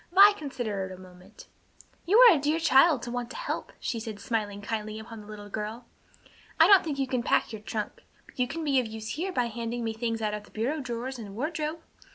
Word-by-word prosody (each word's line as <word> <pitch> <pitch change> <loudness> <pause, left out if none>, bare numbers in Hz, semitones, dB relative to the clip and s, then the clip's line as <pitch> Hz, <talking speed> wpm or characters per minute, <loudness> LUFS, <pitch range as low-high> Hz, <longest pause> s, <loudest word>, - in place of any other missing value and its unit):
Vi 400 +3 +8
considered 220 - -4
a 185 - -8
moment. 185 - -15 0.6
"You 405 +5 +5
are 480 -5 +10
a - - 0
dear 300 +3 +1
child 300 -3 +5
to 240 - -5
want 245 -1 -3
to - - -9
help," - - -4
she 230 - -3
said, 220 -2 -6
smiling 205 -2 -2
kindly 215 +1 -4
upon 220 0 -9
the 205 - -14
little 210 -1 -9
girl. 215 +3 -5 0.7
"I - - +9
don't 395 -2 +7
think 300 -4 -3
you 270 - +1
can 255 -2 -1
pack 230 - +1
your 215 - -6
trunk, 215 0 -5 0.2
but - - -19
you 250 - +2
can 325 +5 -5
be 280 -3 +3
of 245 - -1
use 220 0 -7
here 365 +5 -2
by 250 -9 +1
handing 235 +1 -4
me 225 -1 -2
things 230 0 -2
out 215 -1 -1
of 210 0 -5
the - - -19
bureau 255 +8 -2
drawers 250 0 -4
and 200 -3 -8
wardrobe. 310 +4 -3
235 Hz, 230 wpm, -28 LUFS, 215-295 Hz, 0.7 s, are